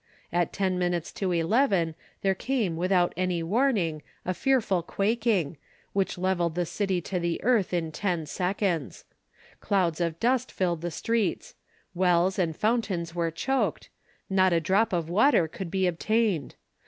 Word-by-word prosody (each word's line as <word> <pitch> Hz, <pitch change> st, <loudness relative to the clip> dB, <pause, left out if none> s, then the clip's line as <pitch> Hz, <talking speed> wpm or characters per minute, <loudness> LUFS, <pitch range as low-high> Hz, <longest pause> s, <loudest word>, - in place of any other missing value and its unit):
At 175 Hz, 0 st, +1 dB
ten 185 Hz, -2 st, 0 dB
minutes 175 Hz, -2 st, -1 dB
to 190 Hz, -2 st, -2 dB
eleven 175 Hz, -, +2 dB, 0.3 s
there 195 Hz, -1 st, +3 dB
came 215 Hz, -4 st, -1 dB
without 180 Hz, +1 st, +2 dB
any 180 Hz, -2 st, -1 dB
warning 190 Hz, -, +1 dB, 0.2 s
a 185 Hz, -, 0 dB
fearful 220 Hz, -6 st, +1 dB
quaking, 200 Hz, -4 st, 0 dB, 0.4 s
which 195 Hz, -2 st, 0 dB
levelled 175 Hz, -3 st, 0 dB
the 175 Hz, 0 st, 0 dB
city 190 Hz, 0 st, -1 dB
to 180 Hz, +2 st, -3 dB
the 170 Hz, -1 st, -1 dB
earth 230 Hz, -4 st, +2 dB
in 165 Hz, -3 st, -1 dB
ten 175 Hz, -1 st, -1 dB
seconds; 180 Hz, -1 st, -2 dB, 0.5 s
clouds 180 Hz, -4 st, 0 dB
of 170 Hz, -1 st, -1 dB
dust 255 Hz, +1 st, +1 dB
filled 175 Hz, -3 st, -1 dB
the 175 Hz, -, -2 dB
streets; 220 Hz, +4 st, -1 dB, 0.4 s
wells 180 Hz, +1 st, +2 dB
and 165 Hz, -3 st, 0 dB
fountains 205 Hz, -7 st, 0 dB
were 170 Hz, -1 st, 0 dB
choked; 265 Hz, +12 st, -1 dB, 0.4 s
not 190 Hz, -1 st, +3 dB
a 170 Hz, -, +4 dB
drop 190 Hz, +7 st, +2 dB
of 170 Hz, -3 st, -1 dB
water 190 Hz, -, +4 dB
could 175 Hz, +2 st, -7 dB
be 190 Hz, +1 st, 0 dB
obtained. 185 Hz, -, 0 dB
185 Hz, 150 wpm, -27 LUFS, 170-205 Hz, 0.5 s, a